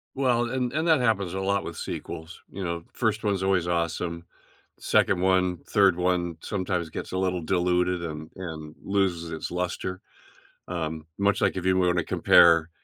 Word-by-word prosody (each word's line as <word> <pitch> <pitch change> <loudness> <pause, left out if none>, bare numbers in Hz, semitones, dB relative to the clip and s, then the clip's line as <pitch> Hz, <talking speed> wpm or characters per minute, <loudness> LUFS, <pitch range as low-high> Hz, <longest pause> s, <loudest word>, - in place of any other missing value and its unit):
Well, 125 -3 +2
and 125 -2 -1
and 160 +2 0
that 160 -4 +5
happens 100 -7 +1
a 95 - -2
lot 100 +1 0
with - - -6
sequels, 80 +2 -7
you 100 - -6
know, 85 -1 -3
1st 110 -1 0
one's 100 -2 0
always 95 -3 +1
awesome. 85 0 -2 0.5
2nd - - +2
one, 90 -1 +2
3rd 100 -4 +4
one 90 -2 0
sometimes 90 -4 -2
gets - - -6
a 95 - -1
little 90 -2 0
diluted 90 0 +1
and 80 -1 -6
and 80 -4 -7
loses 90 -4 0
its 80 - -5
luster, 90 +1 -3 0.7
um, 80 -2 -4
much 100 +1 +2
like - - +1
if 90 - -3
you 95 0 +3
wanna 90 -1 +2
compare 85 0 +5
90 Hz, 170 wpm, -26 LUFS, 85-95 Hz, 0.7 s, that